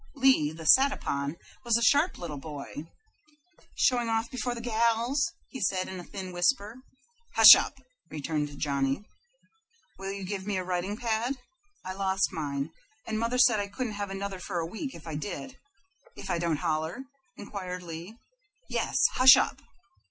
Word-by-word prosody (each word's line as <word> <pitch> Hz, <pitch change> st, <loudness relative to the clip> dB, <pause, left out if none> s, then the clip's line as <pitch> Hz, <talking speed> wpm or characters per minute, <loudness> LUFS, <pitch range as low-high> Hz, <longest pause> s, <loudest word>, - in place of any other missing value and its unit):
Lee, 265 Hz, -, +3 dB
the 160 Hz, 0 st, -10 dB
sat 270 Hz, -, +6 dB
upon, 140 Hz, -, -3 dB, 0.3 s
was 235 Hz, -2 st, +3 dB
a 235 Hz, -, -1 dB
sharp 290 Hz, +9 st, +3 dB
little 150 Hz, -5 st, -6 dB
boy. 145 Hz, +1 st, -8 dB, 0.9 s
"Showing 240 Hz, -2 st, +2 dB
off 225 Hz, +1 st, -1 dB
before 250 Hz, -1 st, -3 dB
the -, -, -6 dB
gals!" 235 Hz, +4 st, +1 dB, 0.2 s
he 265 Hz, -, -8 dB
said, 185 Hz, -1 st, 0 dB
in 190 Hz, -, -7 dB
a -, -, -8 dB
thin 185 Hz, 0 st, -8 dB
whisper. 205 Hz, +5 st, 0 dB, 0.6 s
"Hush 225 Hz, -1 st, +12 dB
up!" 285 Hz, -, -2 dB, 0.3 s
returned 150 Hz, -1 st, -3 dB
Johnny. 140 Hz, +4 st, -1 dB, 1.0 s
"Will 195 Hz, 0 st, -4 dB
you 200 Hz, 0 st, -6 dB
give 190 Hz, +1 st, -5 dB
me 205 Hz, -2 st, -1 dB
a 185 Hz, -, -2 dB
writing 185 Hz, +3 st, -2 dB
pad 235 Hz, +2 st, -1 dB, 0.5 s
I 185 Hz, -, -4 dB
lost 190 Hz, 0 st, 0 dB
mine, 145 Hz, -2 st, -3 dB, 0.3 s
and 220 Hz, -1 st, -2 dB
mother 230 Hz, +2 st, -1 dB
said 240 Hz, -4 st, +5 dB
I 200 Hz, -, -2 dB
couldn't 225 Hz, +2 st, -4 dB
have 205 Hz, -1 st, -4 dB
another 195 Hz, 0 st, -5 dB
for 180 Hz, -, -5 dB
a 165 Hz, -, -1 dB
week 225 Hz, -, -6 dB
if 165 Hz, -, -12 dB
I 160 Hz, -, -6 dB
did 205 Hz, -, -6 dB, 0.6 s
if -, -, -6 dB
I 170 Hz, -, 0 dB
don't 165 Hz, -3 st, 0 dB
holler?" 160 Hz, +9 st, -2 dB, 0.3 s
inquired 185 Hz, -3 st, -6 dB
Lee. 170 Hz, +6 st, -8 dB, 0.5 s
"Yes. -, -, -1 dB, 0.2 s
Hush 260 Hz, +1 st, +9 dB
up!" -, -, -1 dB
195 Hz, 165 wpm, -28 LUFS, 165-230 Hz, 1.0 s, Hush